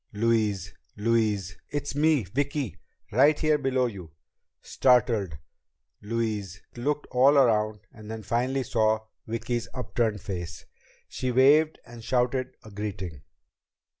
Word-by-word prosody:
"Louise! 105 Hz, -4 st, 0 dB, 0.2 s
Louise! 105 Hz, -4 st, 0 dB
It's 145 Hz, -1 st, -3 dB
me! 150 Hz, -2 st, +3 dB
Vicki! 140 Hz, -, -2 dB, 0.4 s
Right 145 Hz, +7 st, +5 dB
here 155 Hz, -1 st, +2 dB
below 130 Hz, -2 st, +1 dB
you!" 95 Hz, -8 st, -6 dB, 0.5 s
Startled, 115 Hz, -, +2 dB, 0.6 s
Louise 105 Hz, -4 st, -3 dB, 0.2 s
looked 145 Hz, +5 st, -1 dB
all 135 Hz, +3 st, +5 dB
around 110 Hz, -5 st, +3 dB
and 110 Hz, -1 st, -12 dB
then 110 Hz, 0 st, -6 dB
finally 125 Hz, +6 st, 0 dB
saw 110 Hz, -2 st, +1 dB, 0.2 s
Vicki's 115 Hz, +1 st, -2 dB
upturned 115 Hz, -4 st, -1 dB
face. 85 Hz, -3 st, -6 dB, 0.4 s
She 130 Hz, -, -3 dB
waved 145 Hz, +5 st, +5 dB
and 120 Hz, -1 st, -11 dB
shouted 125 Hz, +1 st, 0 dB
a 110 Hz, -, -12 dB
greeting. 95 Hz, -7 st, -5 dB
115 Hz, 115 wpm, -27 LUFS, 105-130 Hz, 0.6 s, Right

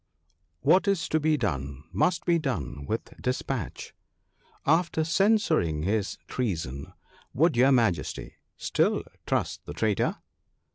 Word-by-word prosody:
What 190 Hz, +2 st, +4 dB
is 195 Hz, -4 st, +1 dB
to 155 Hz, -, +2 dB
be 155 Hz, 0 st, +2 dB
done 70 Hz, -, -3 dB
must 155 Hz, -, +1 dB
be 170 Hz, -1 st, +3 dB
done 80 Hz, -, -3 dB
with 110 Hz, -, -3 dB
despatch. 125 Hz, -4 st, -3 dB, 0.7 s
After 160 Hz, +1 st, +2 dB
censuring 170 Hz, -, +2 dB
his 100 Hz, +2 st, -1 dB
treason, 80 Hz, -, -3 dB, 0.4 s
would 160 Hz, +2 st, +3 dB
your 130 Hz, +3 st, +5 dB
Majesty 110 Hz, -, +1 dB, 0.2 s
still -, -, +1 dB, 0.2 s
trust -, -, -1 dB
the -, -, -5 dB
traitor 105 Hz, +6 st, +1 dB
125 Hz, 115 wpm, -27 LUFS, -, 0.7 s, your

